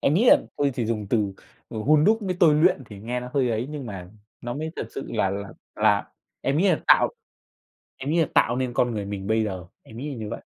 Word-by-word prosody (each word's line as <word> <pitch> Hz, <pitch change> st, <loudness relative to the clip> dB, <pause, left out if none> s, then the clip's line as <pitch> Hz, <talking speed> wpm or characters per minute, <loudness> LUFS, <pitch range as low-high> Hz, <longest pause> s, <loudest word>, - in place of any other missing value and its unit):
Em 145 Hz, -, +2 dB
nghĩ 215 Hz, +8 st, +3 dB
là -, -, +9 dB, 0.2 s
thôi 140 Hz, -1 st, +2 dB
chỉ 120 Hz, -4 st, -2 dB
dùng 110 Hz, -3 st, -2 dB
từ, 105 Hz, -4 st, +1 dB, 0.4 s
ừ, 110 Hz, -, -6 dB
hun 150 Hz, +6 st, +4 dB
đúc 220 Hz, +4 st, +4 dB
với 185 Hz, -3 st, -2 dB
tôi 160 Hz, -4 st, +6 dB
luyện 150 Hz, -3 st, +3 dB
thì 105 Hz, -1 st, -11 dB
nghe 120 Hz, +4 st, -3 dB
nó 125 Hz, -, -7 dB
hơi 130 Hz, -3 st, +2 dB
ấy, 115 Hz, +3 st, -1 dB
nhưng 145 Hz, -4 st, -6 dB
mà 95 Hz, -4 st, -8 dB, 0.3 s
nó 120 Hz, 0 st, -4 dB
mới 155 Hz, +2 st, -4 dB
thật -, -, -3 dB
sự -, -, -4 dB
là 95 Hz, -, +1 dB
là 100 Hz, 0 st, -4 dB, 0.3 s
là -, -, +3 dB, 0.4 s
em 140 Hz, +2 st, 0 dB
nghĩ 195 Hz, +4 st, +3 dB
là -, -, +2 dB
tạo -, -, +6 dB, 0.9 s
em 135 Hz, +2 st, -3 dB
nghĩ 170 Hz, -, +2 dB
là 160 Hz, -, +2 dB
tạo 120 Hz, -, +3 dB
nên 130 Hz, -1 st, -2 dB
con 120 Hz, 0 st, +2 dB
người 105 Hz, -2 st, -3 dB
mình 100 Hz, -1 st, -5 dB
bây 110 Hz, 0 st, +2 dB
giờ, 95 Hz, -4 st, -4 dB, 0.2 s
em 110 Hz, -, -13 dB
nghĩ 145 Hz, +4 st, -4 dB
là 140 Hz, -, -5 dB
như 110 Hz, -3 st, -6 dB
vậy. -, -, -6 dB
120 Hz, 260 wpm, -25 LUFS, 105-150 Hz, 0.9 s, là